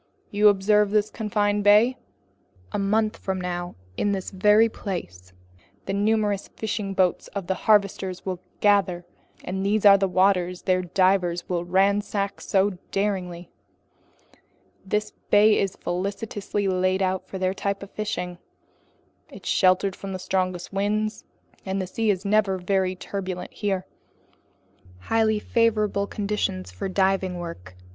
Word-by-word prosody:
"You 210 +1 +4
observe 210 +1 +4
this 210 0 +1
confined 205 -1 0
bay? 210 +5 +5 0.8
A - - -2
month 215 +2 +1
from 190 -1 -3
now 175 -1 -4 0.2
in 205 - +1
this 190 -2 -4
very 210 +3 +5
place, 90 - -6 0.5
the 195 - -3
numerous 205 -1 +1
fishing 210 -3 -4
boats 185 -2 +1
of 200 -3 -3
the 190 - 0 0.2
harvesters 195 -3 +2
will 185 -2 -3 0.2
gather, 195 -4 +2 0.4
and 190 +1 -3
these 210 +1 +1
are 200 -1 +8
the 195 - +2
waters 180 -1 +1
their 185 -1 +2
divers 180 -1 +1
will 175 -1 -2
ransack 200 +2 +1
so 195 -1 +1
daringly. 180 -4 -2 1.3
This 210 +2 -1 0.2
bay 210 +1 +5
is 195 -2 -1
felicitously 200 +2 -3
laid 185 +1 +1
out 185 0 -1
for 190 - -6
their 185 0 0
type 200 0 -3
of 200 - -11
fishing. 180 -4 -4 0.9
It's - - -11
sheltered 185 0 +3
from 195 -1 -7
the - - -3
strongest 185 0 -2
winds, 210 +2 -1 0.4
and 190 0 -2
the 190 - -2
sea 220 +4 -1
is 195 -1 0
never 200 -2 +2
very 185 0 0
turbulent 185 -1 -5
here, 195 -3 -2 1.1
highly 220 - +1
favorable 215 -2 +1
conditions 200 - -2
for 90 - -5
diving 190 -1 +1
work. 95 - -8
195 Hz, 135 wpm, -24 LUFS, 185-205 Hz, 1.3 s, are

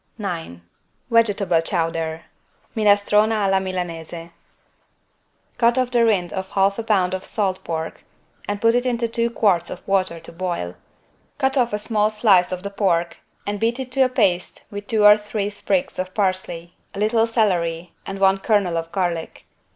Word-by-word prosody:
9 85 +2 -5 0.5
VEGETABLE 205 -7 +3
CHOWDER 165 -1 -2 0.5
(Minestrone 210 0 +4
alla 195 -3 +2
Milanese) 170 -3 -5 1.3
Cut 235 +1 +4
off 255 -1 +1
the 240 -1 +3
rind 195 -6 +1
of 190 -1 -4
1/2 200 +3 +1
lb. 190 -3 +1
salt 195 -3 -2
pork 160 -1 -5 0.4
and 205 0 -2
put 230 +2 +4
it 245 0 +2
into 235 -1 0
two 230 +1 -1
quarts 190 -7 +1
of - - -9
water 185 -4 0
to 165 - -12
boil. 170 - -3 0.6
Cut 265 +1 +1
off 245 -3 +2
a 210 - 0
small 210 0 +1
slice 210 -5 +3
of 185 0 -4
the 200 - -5
pork 175 -4 0 0.3
and 205 0 -3
beat 230 +4 0
it 255 -1 -5
to 270 +1 +1
a 260 - +5
paste 185 -8 0
with 205 0 -7
two 215 -2 +2
or 210 0 +9
three 210 -1 -3
sprigs 275 +6 -2
of 185 0 -4
parsley, 185 -4 -2 0.2
a - - -5
little 225 +2 +2
celery 175 -7 0
and 195 - -6
one 195 0 +3
kernel 195 -5 +1
of 165 0 -7
garlic. 175 -4 -3
195 Hz, 165 wpm, -22 LUFS, 175-220 Hz, 1.3 s, or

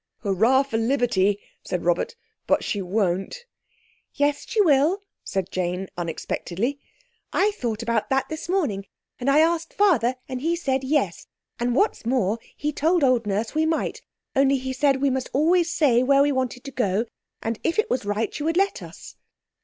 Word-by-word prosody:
"Hurrah 225 +7 +3
for 265 -5 -2
liberty!" 225 -5 +2 0.2
said 180 -2 -3
Robert, 175 - +1 0.3
"but - - +2
she 205 - -2
won't." 195 - -1 0.7
"Yes 290 0 +1
she 445 - -1
will," 330 +2 +4 0.2
said 190 -2 -3
Jane 185 +1 -2
unexpectedly. 180 - -3 0.5
"I 415 +2 +2
thought 235 - -3
about 230 -2 0
that 265 0 +1
this 315 +1 -6
morning, 260 - 0 0.3
and 255 +2 0
I 290 +3 +5
asked 330 0 0
Father, 285 - +3
and 255 -1 -5
he 330 +3 +1
said 270 -6 -1
yes; 265 - 0 0.3
and 240 0 0
what's 410 +10 +1
more 230 -3 +1 0.2
he 300 +1 -1
told 325 +3 +2
old 250 -4 +3
Nurse 210 +3 -1
we 315 +1 +2
might, 320 0 -1 0.3
only 275 0 +4
he 260 0 -4
said 275 0 +2
we 280 - +3
must 260 -1 -2
always 335 +4 +3
say 255 -7 +3
where 275 +2 +4
we 290 - +2
wanted 255 -2 -2
to 275 - -7
go, 215 -3 0 0.4
and 225 -1 -2
if 335 - 0
it 435 - +2
was 250 - 0
right 205 +2 -1
she - - -5
would 325 +3 0
let 395 +1 +1
us." - - -11
260 Hz, 175 wpm, -24 LUFS, 220-305 Hz, 0.7 s, I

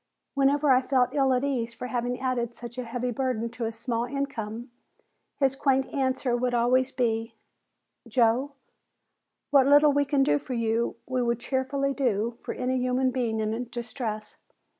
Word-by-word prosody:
Whenever 280 +1 +3
I 255 0 +5
felt 255 -1 +1
ill 270 -2 +3
at 255 0 +2
ease 240 -4 -2
for 240 - -6
having 245 0 -2
added 245 -2 -1
such 240 +1 -8
a 250 - -4
heavy 245 +1 -2
burden 240 -2 -1
to 235 0 -5
his 225 0 -4
small 235 0 -2
income, 240 -3 -4 0.7
his 270 -2 +2
quaint 270 -1 +2
answer 260 -2 0
would 245 0 0
always 255 +2 +2
be: 225 -3 -1 0.7
"Joe, 245 +4 +2 1.0
what 275 -2 +5
little 290 +1 +6
we 285 0 +2
can 275 -1 +2
do 145 - +2
for 255 - -5
you 230 0 0
we 255 0 -1
would 235 -1 0
cheerfully 275 +2 -1
do 235 -4 0
for - - -5
any 255 0 -1
human 255 +1 +1
being 235 -3 -1
in 220 +3 -2
distress. 230 -2 -5
250 Hz, 165 wpm, -27 LUFS, 235-265 Hz, 1.0 s, little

